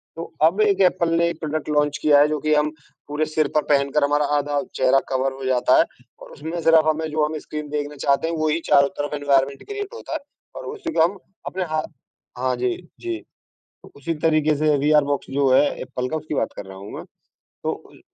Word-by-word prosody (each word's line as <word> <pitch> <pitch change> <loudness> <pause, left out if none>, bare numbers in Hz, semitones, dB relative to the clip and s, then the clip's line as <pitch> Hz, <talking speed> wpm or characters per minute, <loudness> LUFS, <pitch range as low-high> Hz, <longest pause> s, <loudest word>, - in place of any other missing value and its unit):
तो 165 - -5 0.2
अब 175 +7 +4
एक 200 -2 +3
एप्पल 180 -2 +3
ने 170 - +3
एक 170 - -6
प्रोडक्ट 155 -1 -3
लॉन्च 150 -1 +1
किया 145 -2 +5
है, 145 - +6
जो 150 -1 -1
कि 155 +1 +1
हम 150 0 +2 0.4
पूरे 150 +1 -1
सिर 155 0 0
पर 150 - +5
पहनकर 140 +1 +2
हमारा 145 +1 +2
आधा 145 0 0
चेहरा 130 +1 +4
कवर 135 0 0
हो 130 - -6
जाता 125 0 +3
है, - - +7 0.4
और - - -12
उसमें 160 +4 -5
सफ़र्फ 160 -1 +5
हमें 160 +1 -1
जो 155 0 +2
हम 155 +1 -3
स्क्रीन 150 0 -7
देखना 145 0 -3
चाहते 140 +3 +2
हैं, 165 - -2
वो 155 0 0
ही 160 +2 +1
चारों 140 -1 +6
तरफ 145 +1 -2
एनवायरनमेंट 140 -1 +1
क्रिएट 410 +1 -5
होता 465 - -7
है, 315 - -1 0.4
और - - -7
उसी 365 -7 -5
को - - +3
हम 190 +4 0 0.3
अपने 185 0 -2
हाँ, 155 - +1 0.5
हाँ, 130 0 0
जी, 125 0 -1 0.2
जी। 350 -1 -4 0.8
उसी 155 +4 -3
तरीके 155 -1 +3
से 150 0 +2
विआर 150 +1 +4
बॉक्स 140 -1 -2
जो 135 0 +2
है 130 - +6 0.2
एप्पल 125 0 -4
का, 160 - -2
उसकी 155 -1 -5
बात - - -1
कर 100 - -6
रहा 95 0 -10
हूँ 100 +2 -9
मैं। - - -7 0.6
तो - - 0 0.2
उइ - - -18
150 Hz, 225 wpm, -22 LUFS, 140-160 Hz, 0.8 s, है